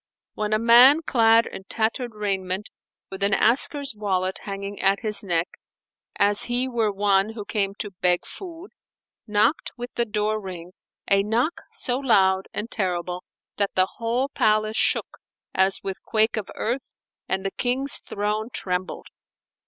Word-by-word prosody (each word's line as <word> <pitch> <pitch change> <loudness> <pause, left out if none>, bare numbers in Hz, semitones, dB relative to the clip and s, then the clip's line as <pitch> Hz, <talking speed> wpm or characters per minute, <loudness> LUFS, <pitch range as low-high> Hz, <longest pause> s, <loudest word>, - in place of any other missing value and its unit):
when 210 0 -3
a 215 - +3
man 245 +7 +7
clad 230 -4 +4
in 190 - -8
tattered 230 +2 -2
raiment, 195 -1 -2 0.4
with 190 0 -7
an 200 0 +3
asker's 275 +4 +3
wallet 190 -3 -1
hanging 200 0 -5
at 195 +1 +2
his 215 -3 0
neck, 175 -2 0 0.7
as 205 0 +3
he 245 +2 0
were 230 -4 0
one 200 +1 +2
who 210 -3 -7
came 200 -2 -1
to 205 -1 -6
beg 180 -1 +2
food, 360 0 -8 0.6
knocked 210 +8 +1
with 245 0 -6
the 235 - 0
door 215 0 -1
ring 180 -3 -8 0.4
a 200 0 +4
knock 230 +10 0
so 250 +1 0
loud 190 -7 +3
and 220 +3 -5
terrible 180 -2 -2 0.3
that 200 -1 -1
the 185 - +4
whole 240 +3 0
palace 215 -3 +1
shook - - 0 0.3
as 190 +1 +1
with 195 -1 -4
quake 220 +1 +1
of 215 -3 -4
earth 245 +4 -3 0.4
and 190 0 -1
the 195 - 0
King's 260 +5 0
throne 210 +2 -3
trembled. 185 -3 -3
210 Hz, 150 wpm, -24 LUFS, 195-235 Hz, 0.7 s, man